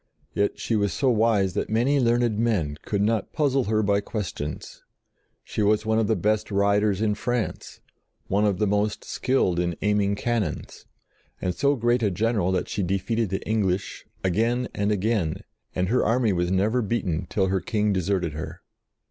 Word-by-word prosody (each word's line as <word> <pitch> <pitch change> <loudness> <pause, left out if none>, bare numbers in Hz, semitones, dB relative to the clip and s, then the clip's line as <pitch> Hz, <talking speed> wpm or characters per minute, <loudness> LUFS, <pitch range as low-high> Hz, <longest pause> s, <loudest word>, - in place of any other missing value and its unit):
Yet 100 0 0
she 115 - -1
was 100 -2 +1
so 135 -3 +2
wise 105 -5 +2
that 100 - -2
many 125 +6 +2
learned 120 -3 +2
men 100 -11 0
could 100 -1 0
not 110 -1 0
puzzle 135 -4 +1
her 110 +1 +1
by 100 0 +2
questions: 95 -9 -5 0.6
she - - -3
was 105 +1 +2
one 110 0 +2
of 110 - +1
the 110 - +2
best 105 +3 0
riders 100 0 +2
in 105 -1 +2
France; 115 0 -3 0.4
one 100 +2 +1
of 100 -3 +2
the 105 - +1
most 105 +1 0
skilled 110 -10 0
in 85 -1 -1
aiming 105 -1 +2
cannons, 110 -6 -3 0.5
and 90 - -1
so 140 +8 +2
great 120 0 +1
a 105 - +2
general 100 -1 0
that 95 - -1
she 105 - -3
defeated 100 +4 -1
the 95 - -4
English 100 -3 -1 0.2
again 115 +7 +1
and 100 +1 0
again, 105 -5 0 0.3
and 90 0 0
her 125 - +2
army 115 -1 +2
was 90 -1 0
never 105 +7 +2
beaten 95 -7 -2
till 95 -2 +1
her 95 -1 0
King 105 +2 0
deserted 90 -3 0
her. 80 +1 -7
105 Hz, 175 wpm, -25 LUFS, 95-115 Hz, 0.6 s, so